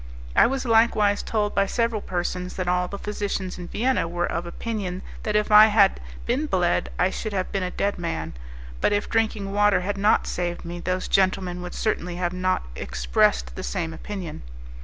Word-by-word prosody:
I -, -, +7 dB
was 265 Hz, +1 st, -2 dB
likewise 225 Hz, -3 st, +3 dB
told 210 Hz, -2 st, -1 dB
by 200 Hz, 0 st, +2 dB
several 230 Hz, 0 st, 0 dB
persons 180 Hz, 0 st, -3 dB
that 185 Hz, -1 st, -3 dB
all 180 Hz, 0 st, +1 dB
the 200 Hz, -, -6 dB
physicians 200 Hz, -3 st, -3 dB
in 175 Hz, -, -6 dB
Vienna 250 Hz, -2 st, 0 dB
were 175 Hz, +1 st, -1 dB
of 170 Hz, +1 st, -3 dB
opinion 190 Hz, -1 st, -4 dB, 0.2 s
that 210 Hz, -1 st, -2 dB
if 210 Hz, 0 st, +1 dB
I 210 Hz, +1 st, +10 dB
had 205 Hz, -2 st, +4 dB, 0.3 s
been 265 Hz, +6 st, 0 dB
bled 175 Hz, -7 st, +1 dB
I 185 Hz, +1 st, +2 dB
should 215 Hz, +1 st, -4 dB
have 185 Hz, -1 st, -2 dB
been 195 Hz, -, -1 dB
a 180 Hz, -, -1 dB
dead 200 Hz, +1 st, -1 dB
man; 170 Hz, -1 st, -3 dB, 0.5 s
but -, -, +3 dB
if 205 Hz, -, 0 dB
drinking 215 Hz, -3 st, 0 dB
water 205 Hz, -1 st, +4 dB
had 200 Hz, +2 st, -3 dB
not 205 Hz, +2 st, +3 dB
saved 175 Hz, -1 st, -3 dB
me, 175 Hz, +1 st, -6 dB
those 185 Hz, +1 st, -2 dB
gentlemen 185 Hz, -2 st, +1 dB
would 180 Hz, 0 st, -7 dB
certainly 180 Hz, -5 st, -1 dB
not 180 Hz, -, 0 dB
have 60 Hz, -, -14 dB
expressed -, -, +1 dB
the -, -, -5 dB
same 160 Hz, -, -3 dB
opinion. 185 Hz, -4 st, -6 dB
190 Hz, 190 wpm, -24 LUFS, 175-210 Hz, 0.5 s, I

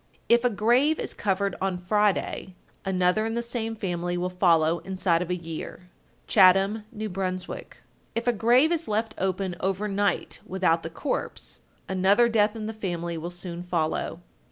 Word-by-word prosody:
If 235 Hz, +1 st, +4 dB
a 245 Hz, -, +4 dB
grave 240 Hz, +8 st, +3 dB
is -, -, -4 dB
covered 200 Hz, 0 st, -1 dB
on 190 Hz, -1 st, 0 dB
Friday, 195 Hz, 0 st, 0 dB, 0.3 s
another 185 Hz, +2 st, +2 dB
in 225 Hz, -, -3 dB
the 235 Hz, -, -1 dB
same 230 Hz, -1 st, -3 dB
family 175 Hz, -3 st, -2 dB
will 180 Hz, +1 st, -2 dB
follow 170 Hz, -3 st, +3 dB
inside 185 Hz, -3 st, 0 dB
of 180 Hz, -, -4 dB
a 180 Hz, -, +1 dB
year. 170 Hz, +1 st, -7 dB, 0.4 s
Chatham, 195 Hz, +2 st, +5 dB
N.B. 220 Hz, -2 st, -5 dB
1264. 185 Hz, -1 st, -5 dB, 0.3 s
If 230 Hz, -, -1 dB
a 245 Hz, -, +3 dB
grave 245 Hz, +8 st, +4 dB
is 335 Hz, -1 st, 0 dB
left 215 Hz, +1 st, -1 dB
open 190 Hz, -1 st, -1 dB
over 195 Hz, +2 st, -1 dB
night 200 Hz, 0 st, -1 dB
without 180 Hz, -3 st, +1 dB
the 165 Hz, -, -5 dB
corpse, 225 Hz, -, -4 dB, 0.3 s
another 195 Hz, +5 st, +4 dB
death 215 Hz, -1 st, +2 dB
in 220 Hz, -1 st, -5 dB
the 220 Hz, -, -4 dB
family 175 Hz, -5 st, -3 dB
will 165 Hz, +1 st, -4 dB
soon 175 Hz, -1 st, -6 dB
follow. 170 Hz, -1 st, -2 dB
190 Hz, 165 wpm, -26 LUFS, 180-220 Hz, 0.4 s, Chatham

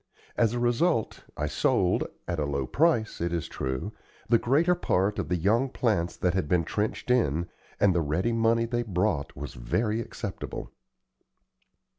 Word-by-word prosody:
As 115 Hz, -1 st, +2 dB
a -, -, -1 dB
result, 120 Hz, +2 st, +1 dB
I 75 Hz, -, -1 dB
sold, 75 Hz, -, +1 dB, 0.2 s
at 85 Hz, -2 st, -2 dB
a 75 Hz, -, 0 dB
low 70 Hz, -1 st, -1 dB
price, 135 Hz, -, +1 dB
it 85 Hz, 0 st, 0 dB
is 85 Hz, -1 st, -2 dB
true, 65 Hz, -1 st, -3 dB, 0.4 s
the 115 Hz, 0 st, +4 dB
greater 155 Hz, +8 st, +3 dB
part 100 Hz, -, 0 dB
of -, -, -3 dB
the 90 Hz, -, +2 dB
young 110 Hz, +10 st, +2 dB
plants 100 Hz, -10 st, 0 dB
that 90 Hz, -2 st, +1 dB
had 95 Hz, -5 st, 0 dB
been 85 Hz, +1 st, +2 dB
trenched 105 Hz, +8 st, -2 dB
in, 85 Hz, -, +2 dB, 0.3 s
and 100 Hz, -2 st, +4 dB
the 85 Hz, -, +2 dB
ready 80 Hz, +9 st, 0 dB
money 115 Hz, 0 st, +2 dB
they 120 Hz, 0 st, -1 dB
brought 95 Hz, -7 st, -1 dB
was -, -, -6 dB
very 110 Hz, -, -1 dB
acceptable. -, -, -6 dB
105 Hz, 165 wpm, -27 LUFS, 85-120 Hz, 0.4 s, the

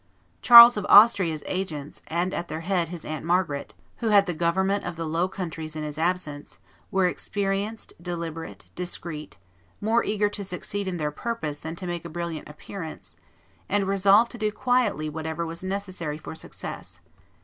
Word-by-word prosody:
Charles 235 Hz, -1 st, +10 dB
of 205 Hz, -, -2 dB
Austria's 195 Hz, -8 st, +6 dB
agents, 155 Hz, -6 st, -4 dB
and 175 Hz, +3 st, -1 dB
at 175 Hz, -, -3 dB
their 155 Hz, 0 st, -5 dB
head 175 Hz, -2 st, 0 dB
his 175 Hz, -2 st, -7 dB
aunt 155 Hz, -2 st, -5 dB
Margaret, 170 Hz, -4 st, -1 dB, 0.2 s
who 230 Hz, -, -3 dB
had 205 Hz, -2 st, +5 dB
the 180 Hz, -, -2 dB
government 190 Hz, +5 st, +1 dB
of 175 Hz, -1 st, -4 dB
the 165 Hz, 0 st, -4 dB
Low 165 Hz, +3 st, 0 dB
Countries 165 Hz, -4 st, -6 dB
in 155 Hz, -, -4 dB
his 150 Hz, 0 st, -6 dB
absence, 165 Hz, -4 st, -2 dB, 0.3 s
were 190 Hz, -1 st, +2 dB
experienced, 200 Hz, +4 st, -2 dB
deliberate, 170 Hz, -2 st, -6 dB
discreet, 170 Hz, -, -5 dB, 0.4 s
more 225 Hz, +3 st, +2 dB
eager 210 Hz, 0 st, +1 dB
to 205 Hz, 0 st, -5 dB
succeed 200 Hz, +1 st, -4 dB
in 180 Hz, -2 st, -2 dB
their 150 Hz, -2 st, -2 dB
purpose 155 Hz, -5 st, -4 dB
than 160 Hz, +1 st, -6 dB
to 180 Hz, -, -6 dB
make 175 Hz, -1 st, -4 dB
a 170 Hz, -, -7 dB
brilliant 170 Hz, -2 st, -5 dB
appearance, 160 Hz, +2 st, -9 dB, 0.5 s
and 200 Hz, -1 st, +1 dB
resolved 200 Hz, +4 st, +4 dB
to 240 Hz, -, -9 dB
do 215 Hz, -1 st, 0 dB
quietly 240 Hz, -9 st, +1 dB
whatever 160 Hz, +2 st, -4 dB
was 165 Hz, +2 st, -6 dB
necessary 185 Hz, -5 st, -3 dB
for 155 Hz, -, -8 dB
success. 160 Hz, -, -8 dB
175 Hz, 170 wpm, -25 LUFS, 160-200 Hz, 0.5 s, Charles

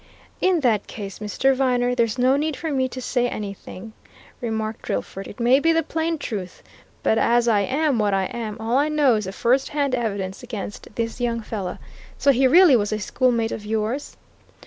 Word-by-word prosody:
"In 370 Hz, -3 st, +3 dB
that 225 Hz, -6 st, +1 dB
case, 200 Hz, -3 st, -7 dB
Mr. 210 Hz, +6 st, +1 dB
Viner, 250 Hz, -2 st, +1 dB
there's 235 Hz, -1 st, 0 dB
no 255 Hz, +2 st, +4 dB
need 300 Hz, +1 st, -1 dB
for 320 Hz, -2 st, -3 dB
me 260 Hz, -2 st, 0 dB
to 255 Hz, -, -7 dB
say 245 Hz, -1 st, 0 dB
anything," 200 Hz, +1 st, -7 dB, 0.5 s
remarked 220 Hz, -2 st, -3 dB
Drillford. 195 Hz, +1 st, -4 dB
"It 205 Hz, -, -11 dB
may 245 Hz, +3 st, +4 dB
be 330 Hz, +3 st, +3 dB
the 330 Hz, 0 st, +2 dB
plain 320 Hz, +1 st, -1 dB
truth. 200 Hz, -10 st, -6 dB, 0.4 s
But 220 Hz, -, +3 dB
as 240 Hz, 0 st, +3 dB
I 220 Hz, -3 st, +4 dB
am 270 Hz, +4 st, +1 dB
what 210 Hz, -1 st, +2 dB
I 195 Hz, -1 st, +1 dB
am, 215 Hz, +1 st, -5 dB
all 225 Hz, +3 st, 0 dB
I 295 Hz, +2 st, +2 dB
know 295 Hz, -4 st, +3 dB
is 215 Hz, -2 st, -1 dB
the 190 Hz, -, -4 dB
first 250 Hz, +6 st, +1 dB
hand 285 Hz, -3 st, -1 dB
evidence 200 Hz, -6 st, -2 dB
against 220 Hz, -4 st, -7 dB
this 230 Hz, +1 st, -3 dB
young 235 Hz, -1 st, 0 dB
fellow. 200 Hz, -4 st, -5 dB, 0.4 s
So 280 Hz, -, +4 dB
he 265 Hz, 0 st, +4 dB
really 335 Hz, 0 st, +7 dB
was 205 Hz, -3 st, +1 dB
a 215 Hz, -, 0 dB
schoolmate 230 Hz, +1 st, 0 dB
of 215 Hz, -, -5 dB
yours?" 220 Hz, +6 st, -3 dB
235 Hz, 195 wpm, -23 LUFS, 215-270 Hz, 0.5 s, really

